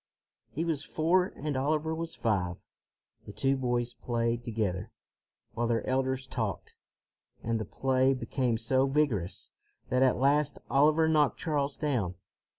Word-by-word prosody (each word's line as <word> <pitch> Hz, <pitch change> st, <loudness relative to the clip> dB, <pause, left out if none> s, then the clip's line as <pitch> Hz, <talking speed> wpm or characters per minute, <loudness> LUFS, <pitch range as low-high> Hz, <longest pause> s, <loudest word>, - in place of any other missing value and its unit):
He 165 Hz, +4 st, -3 dB
was 155 Hz, -4 st, -1 dB
four 170 Hz, +5 st, +2 dB
and 150 Hz, 0 st, -3 dB
Oliver 155 Hz, +4 st, 0 dB
was 165 Hz, 0 st, -4 dB
five. 90 Hz, -6 st, 0 dB, 0.7 s
The -, -, -6 dB
two 135 Hz, +4 st, +1 dB
boys 120 Hz, -2 st, -1 dB
played 115 Hz, 0 st, -1 dB
together, 105 Hz, -6 st, -2 dB, 0.6 s
while 120 Hz, +1 st, -1 dB
their 115 Hz, -1 st, 0 dB
elders 130 Hz, 0 st, 0 dB
talked, 110 Hz, -, -4 dB, 0.7 s
and 115 Hz, 0 st, 0 dB
the 110 Hz, -, -3 dB
play 130 Hz, +4 st, +2 dB
became 125 Hz, -2 st, -1 dB
so 130 Hz, +4 st, +2 dB
vigorous 135 Hz, -, -1 dB, 0.4 s
that 125 Hz, +1 st, +2 dB
at 130 Hz, -1 st, +4 dB
last 145 Hz, +2 st, +2 dB
Oliver 155 Hz, +3 st, +4 dB
knocked 150 Hz, -3 st, +3 dB
Charles 145 Hz, -4 st, -1 dB
down. 120 Hz, -, -1 dB
130 Hz, 140 wpm, -30 LUFS, 115-150 Hz, 0.7 s, at